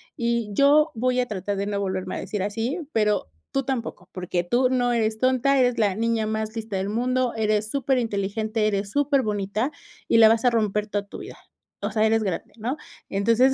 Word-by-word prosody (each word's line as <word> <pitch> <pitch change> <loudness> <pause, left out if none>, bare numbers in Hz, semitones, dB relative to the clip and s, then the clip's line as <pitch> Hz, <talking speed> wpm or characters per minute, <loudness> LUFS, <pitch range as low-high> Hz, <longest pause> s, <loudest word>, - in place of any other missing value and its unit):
y 235 -4 -1
yo 295 +6 +5
voy 250 +2 +1
a 250 - +1
tratar 200 -1 -3
de 200 - -1
no 205 -1 -1
volverme 190 -1 -3
a - - -3
decirme 200 -3 -3
así, 225 - -2
pero 210 - +1 0.2
tú 275 - 0
tampoco, 235 -8 -4
porque 180 -1 -2
tú 245 +8 +2
no 245 -1 +2
eres 220 -2 0
tonta, 260 +2 +3
eres 245 -1 +3
la 210 -3 +2
niña 225 0 0
más 220 +1 -3
lista 220 -3 -4
del 190 +1 -2
mundo, 250 +2 0
eres 215 -1 0
superinteligente, 220 -5 0
eres 200 -1 -1
superbonita 230 -5 0 0.4
y - - +4
la 225 -1 +9
vas 225 0 +2
a - - +7
romper 210 -3 0
toda 205 -1 -3
tu - - -9
vida, - - -9 0.4
o - - -2
sea, 215 -1 +2
eres 225 0 +2
grande, 190 -4 -3
¿no?". 240 +6 -3 0.3
Entonces 230 +6 +3
220 Hz, 195 wpm, -24 LUFS, 205-250 Hz, 0.4 s, la